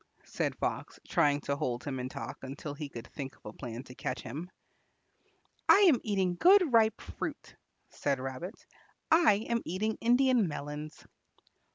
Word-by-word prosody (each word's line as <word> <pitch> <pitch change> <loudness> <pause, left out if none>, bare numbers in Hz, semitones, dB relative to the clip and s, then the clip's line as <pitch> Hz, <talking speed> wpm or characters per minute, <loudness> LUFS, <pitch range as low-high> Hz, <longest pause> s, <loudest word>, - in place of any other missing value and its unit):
said - - -2
Fox, - - -3
trying 145 -1 +3
to 140 -1 -2
hold 125 -3 -2
him 135 -3 -3
in 125 +1 -3
talk - - -7
until 140 +2 -6
he 145 0 -6
could 115 -3 -8
think 135 -2 -7
of - - -30
a 105 - -7
plan 120 0 -7
to 125 - -12
catch 125 0 -4
him. 155 +9 -6 1.2
"I 405 - +8
am 330 - +6
eating 190 -4 0
good 365 - +6
ripe 220 -1 +4
fruit," - - -6 0.3
said 140 -2 -1
Rabbit. 135 - -6 0.5
"I 310 -11 +5
am 235 -1 0
eating 210 +5 -2
Indian 245 -2 +4
melons." 150 0 -6
155 Hz, 160 wpm, -31 LUFS, 135-225 Hz, 1.2 s, I